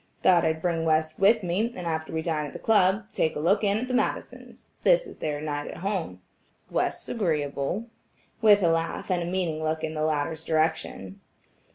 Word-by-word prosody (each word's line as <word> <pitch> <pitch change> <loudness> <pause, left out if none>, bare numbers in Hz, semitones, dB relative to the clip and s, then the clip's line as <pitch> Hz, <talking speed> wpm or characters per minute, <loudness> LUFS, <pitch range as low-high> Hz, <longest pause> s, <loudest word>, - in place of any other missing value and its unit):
"Thought 175 -2 +5
I'd 160 0 -1
bring 170 -2 0
West 155 0 +1
with 210 +2 +4
me, 190 +7 0
and 180 - -6
after 160 -1 -2
we 160 0 -2
dine 155 -3 -1
at - - -11
the - - -6
club, 205 -1 +2
take 160 - 0
a - - -3
look 190 +8 +2
in 200 0 +2
at 245 +3 -3
the 255 - -3
Madisons, 250 - -3 0.2
this - - +4
is 405 - -12
their 150 0 -3
at 145 0 -4
home 195 -2 -2
night. 90 - -14 0.5
West's - - -1
agreeable," 155 - -1 0.6
with 205 -3 +6
a 170 - +4
laugh 165 +2 -1
and 180 -1 +1
a 170 - -3
meaning 175 -4 -1
look 155 0 -1
in 155 - -2
the 155 - -3
latter's 155 +1 -1
direction. 155 - -1
165 Hz, 200 wpm, -26 LUFS, 155-195 Hz, 0.6 s, with